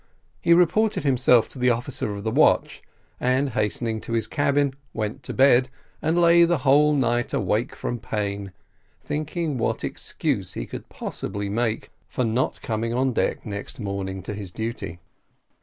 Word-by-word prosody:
He 170 - +5
reported 190 +3 +3
himself 125 -4 +4
to - - -10
the 125 0 +3
officer 120 -1 -1
of 100 0 -6
the 110 - -1
watch, - - +3 0.4
and 130 +2 +1
hasting 110 0 -1
to 115 - -6
his 115 -2 +1
cabin, 140 0 +1 0.2
went 110 +4 -3
to 125 - -6
bed, 130 -1 +5 0.3
and 160 +3 +1
lay 170 0 +6
the 170 0 +3
whole 150 +2 +5
night 120 -3 +1
awake 105 +4 0
from 120 - -3
pain, 100 -3 -3 0.5
thinking 150 -1 -2
what - - -1
excuse - - -2
he - - -4
could - - -9
possibly 100 0 -4
make 115 +1 -1 0.2
for 125 - -1
not 115 +3 -1
coming 115 +1 -2
on 130 0 +1
deck - - -1
next 100 +2 -6
morning 95 -3 -4
to 105 - -5
his 100 -3 -7
duty. 110 -6 -5
120 Hz, 160 wpm, -24 LUFS, 105-140 Hz, 0.5 s, lay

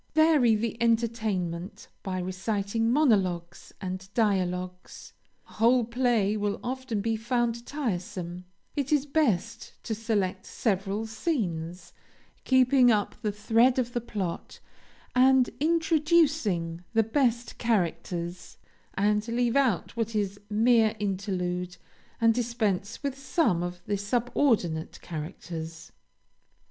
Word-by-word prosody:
Vary 305 -8 +5
the 230 +2 -3
entertainment 220 -6 -1
by 190 -2 -3
reciting 200 +4 -1
monologues 190 - +1
and 190 0 -6
dialogues. 185 -4 -1 0.3
A - - -17
whole 235 +2 +3
play 235 -4 +1
will 205 -1 -1
often 255 -4 -3
be 225 +1 0
found 235 +1 -1
tiresome; 180 - -4 0.3
it 280 -1 -2
is 295 -2 +3
best 235 - 0
to 225 - -3
select 210 -4 -1
several 200 0 -1
scenes, 190 - -3 0.5
keeping 260 -1 +5
up 210 -3 +2
the 215 -3 0
thread 225 +5 +3
of 245 -2 -1
the 240 - -1
plot, 195 -7 -5 0.5
and 260 0 +5
introducing 305 - +2
the 225 -1 +4
best 235 0 0
characters, 175 -5 -2 0.4
and 210 +2 +1
leave 235 +1 0
out 255 - +1
what 230 -1 -2
is 205 -1 -1
mere 225 0 +3
interlude, 180 -3 -2 0.4
and 230 0 +4
dispense 225 -3 -1
with 280 -2 -2
some 270 - +1
of 175 0 -5
the 205 0 -1
subordinate 205 - 0
characters. 160 0 -7
220 Hz, 110 wpm, -27 LUFS, 185-245 Hz, 0.5 s, Vary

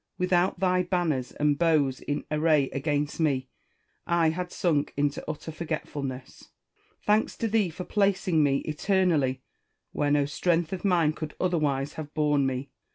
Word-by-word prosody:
Without 180 0 +1
thy 185 -1 +2
banners 175 -8 -1
and 145 -1 +1
bows 150 -6 +2
in 145 0 -3
array 150 -2 +2
against 145 +2 -1
me, 135 -5 0 0.6
I 170 -2 +3
had 180 +2 -4
sunk 150 -5 0
into 145 0 0
utter 155 +1 -5
forgetfulness. 145 -5 -5 0.6
Thanks 210 +1 +2
to 230 - -1
thee 210 -4 +2
for 175 +3 -7
placing 190 -5 +1
me, 140 -2 +2
eternally, 155 -6 +1 0.5
where 145 - 0
no 145 -1 +3
strength 165 +4 0
of 185 - -5
mine 170 -6 +3
could 155 -1 -6
otherwise 150 -6 0
have 150 -1 -8
borne 150 -3 +2
me 130 +1 -4
155 Hz, 150 wpm, -27 LUFS, 145-175 Hz, 0.6 s, I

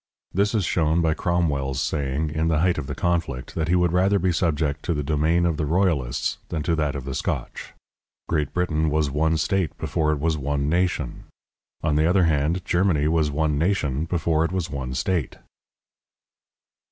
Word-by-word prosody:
This 100 +4 +1
is 100 -5 +1
shown 80 0 +1
by 80 -1 +2
Cromwell's 75 -7 0
saying, 75 +1 -1
in 80 +1 0
the 80 -2 +2
height 90 -2 +2
of 70 - -5
the 70 - -4
conflict, 85 -7 -2
that 80 -1 -1
he 90 - +2
would 90 -1 +2
rather 95 +3 +3
be 95 -1 +1
subject 75 -4 0
to 85 - 0
the 75 - -2
domain 80 +4 +1
of 85 -3 0
the 75 - -1
royalists 80 -8 0
than 80 -2 -2
to 85 +1 +1
that 75 -2 -1
of 70 -2 -5
the 70 - -4
Scotch. - - -4 0.5
Great 75 -4 0
Britain 80 -3 0
was 75 -1 +1
one 80 +3 +1
state 90 0 0
before 75 -1 0
it 75 - -1
was 80 0 0
one 70 0 -1
nation; 85 -4 -1 0.6
on 75 -1 +1
the 80 +1 +3
other 90 +1 +4
hand, 80 +3 +1
Germany 85 -5 +2
was 80 -1 +2
one 75 0 0
nation 80 -5 0
before 80 -2 +1
it 85 - -1
was 90 -2 -2
one 65 -3 -4
state. 85 0 -1
80 Hz, 190 wpm, -24 LUFS, 75-85 Hz, 0.6 s, other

